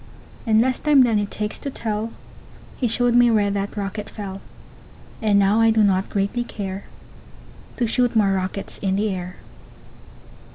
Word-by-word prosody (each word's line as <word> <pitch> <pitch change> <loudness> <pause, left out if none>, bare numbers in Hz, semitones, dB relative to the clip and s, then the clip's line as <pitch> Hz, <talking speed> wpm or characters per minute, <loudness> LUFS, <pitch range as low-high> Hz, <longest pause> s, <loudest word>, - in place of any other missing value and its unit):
In 220 0 +5
less 255 +1 0
time 290 -3 +5
than 225 -4 +2
it 205 -1 -2
takes 210 0 -4
to 280 - -4
tell, 220 -3 -3 0.6
He 250 - -1
showed 240 +1 +1
me 245 0 +6
where 210 -3 +2
that 200 +1 -3
rocket 205 +1 -4
fell; 195 -2 -7 0.8
And 210 -2 +3
now 200 +3 +3
I 225 - +5
do 220 -1 +3
not 190 -1 +2
greatly 200 +4 -1
care 195 -4 -6 0.9
To 245 - +1
shoot 245 +1 +1
more 205 -3 +4
rockets 190 +1 -4
in 190 -1 0
the 210 +2 0
air. 180 -1 -5
210 Hz, 165 wpm, -22 LUFS, 200-230 Hz, 0.9 s, me